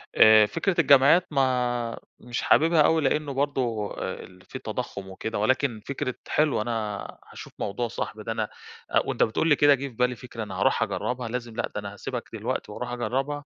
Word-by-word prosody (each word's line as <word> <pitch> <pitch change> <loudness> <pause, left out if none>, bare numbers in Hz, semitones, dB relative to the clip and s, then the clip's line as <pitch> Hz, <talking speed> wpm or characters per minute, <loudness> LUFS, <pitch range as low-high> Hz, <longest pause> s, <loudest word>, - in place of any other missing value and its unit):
آآ، 110 -1 +8
فكرة 170 - 0
الجمعيّات، 140 +5 +6
ما 125 -3 0 0.2
مش 120 0 -4
حاببها 160 0 +4
أوي 160 +1 +4
لأنه 145 +1 0
برضه 130 -6 -1
آآ - - -4
ال 90 0 -15
في - - -8
تضخُّم 100 -1 -5
وكده 105 +3 -4
ولكن 120 0 +1
فكرة 140 -2 -3
حلوة، 150 -7 +2
أنا 110 -3 -2 0.3
هاشوف - - -10
موضوع 120 +4 -2
صاحبي 110 -1 -5
ده 115 - -4
أنا 110 -1 -1 0.5
أ - - +4
وأنت - - +1
بتقول 140 +9 +1
لي 150 - +6
كده 145 0 +5
جه 140 +1 -5
في 125 - -12
بالي 125 +1 +1
فكرة 115 -1 -7
أنا 95 -2 -6
هاروح - - +3
أجرّبها، 125 -1 -3
لازم، 120 -1 -5
لأ 120 - -1
ده - - -1
أنا 100 0 -7
هاسيبك 105 - -5
دلوقتي - - -3
وأرُوح 120 +3 -5
أجرّبها، 130 +5 -2
125 Hz, 190 wpm, -26 LUFS, 110-140 Hz, 0.5 s, آآ